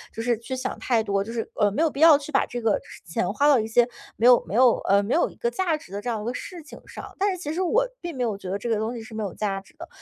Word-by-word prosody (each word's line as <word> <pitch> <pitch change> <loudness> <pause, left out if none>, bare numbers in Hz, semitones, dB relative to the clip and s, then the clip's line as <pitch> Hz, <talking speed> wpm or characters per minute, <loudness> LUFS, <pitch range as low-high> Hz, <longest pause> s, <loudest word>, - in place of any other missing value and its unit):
就 225 - -4
是 240 0 +2
去 260 +3 -5
想 260 0 -4
太 230 -3 +1
多， 200 -2 0
就 220 - -8
是， 230 -1 -3
呃， 210 -1 +3
没 215 +11 0
有 320 - +2
必 275 - -8
要 320 -2 +8
去 290 +1 -9
把 270 - +3
这 245 - -5
个 225 -2 +1
就 - - -23
是 - - -13
钱 - - -1
花 290 - +2
到 285 -4 +6
一 220 - -2
些 235 +2 +3 0.3
没 230 - 0
有 245 -1 +7
没 200 - -4
有 245 -1 +5
呃， 200 +1 +2
没 210 - -1
有 340 - +2
一 - - -16
个 475 -1 -2
价 365 -7 0
值 240 - -16
的 200 +1 -4
这 245 - -4
样 225 -3 -2
一 - - -7
个 240 - -2
事 350 +6 -7
情 295 - -12
上。 - - -10
但 400 +1 +2
是 370 - -4
其 310 -4 -4
实 355 - -2
我 445 +7 +2 0.2
并 345 -3 -6
没 255 - -1
有 220 -4 -1
觉 190 -2 -8
得 195 - -1
这 220 +4 -5
个 225 - +2
东 220 +3 -2
西 235 - -6
是 220 +1 -12
没 220 0 -3
有 195 - -4
价 200 -2 -2
值 195 - -22
的。 - - -9
240 Hz, 380 characters per minute, -25 LUFS, 215-295 Hz, 0.3 s, 要